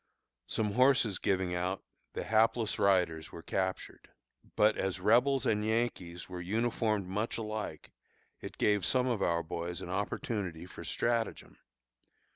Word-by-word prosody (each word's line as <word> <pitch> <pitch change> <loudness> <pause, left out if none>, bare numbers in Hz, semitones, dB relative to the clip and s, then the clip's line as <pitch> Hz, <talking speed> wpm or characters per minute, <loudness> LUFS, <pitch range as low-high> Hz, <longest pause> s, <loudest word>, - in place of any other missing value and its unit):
Some 105 -2 0
horses 125 -4 +3
giving 95 -2 0
out, 90 +2 -2 0.3
the - - -3
hapless 110 0 +2
riders 90 -5 +2
were 85 - -9
captured. 95 -1 -3 0.5
But 105 +1 +4
as 95 -1 -2
Rebels 125 +7 +3
and 105 -1 +2
Yankees 110 -6 -1
were 90 -1 -6
uniformed 110 +1 0
much 105 +5 -2
alike, 110 -8 -5 0.5
it - - -8
gave 105 -2 +2
some 130 -2 +2
of 120 -5 0
our 85 -2 +1
boys 85 +2 -4
an 90 - -6
opportunity 95 -3 -3
for 90 - -10
stratagem. 115 -1 -2
100 Hz, 135 wpm, -32 LUFS, 90-115 Hz, 0.5 s, But